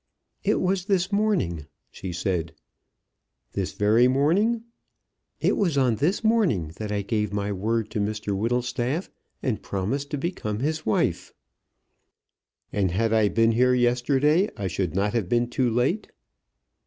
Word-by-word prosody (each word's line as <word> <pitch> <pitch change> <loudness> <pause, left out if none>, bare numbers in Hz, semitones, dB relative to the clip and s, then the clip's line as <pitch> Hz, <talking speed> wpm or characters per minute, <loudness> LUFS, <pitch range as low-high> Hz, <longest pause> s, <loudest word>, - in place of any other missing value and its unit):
"It - - +2
was 185 0 0
this 190 -1 +1
morning," 190 - 0 0.2
she 95 - -6
said. 85 -3 -2 1.0
"This - - -2
very 110 +4 +4
morning?" 180 - +2 0.8
"It - - +2
was 170 -8 +1
on 125 -5 +3
this 175 - 0
morning 190 - +2
that 105 -1 -4
I 100 -1 -1
gave 105 0 -1
my 105 0 -2
word 110 +3 -1
to - - -2
Mr 105 -1 -2
Whittlestaff, 125 - -1 0.3
and 125 -5 -1
promised 115 +9 -3
to 150 - -2
become 135 - -3
his 155 +4 -2
wife." 110 - 0 1.4
"And 100 -2 +1
had 110 +6 0
I 110 -2 +4
been 115 +1 +3
here 125 +2 +3
yesterday 135 - +2
I 100 - -4
should 90 -2 -2
not 100 +2 +1
have 110 -7 -1
been 120 0 +2
too 125 0 +1
late?" 125 - 0
120 Hz, 145 wpm, -25 LUFS, 105-150 Hz, 1.4 s, very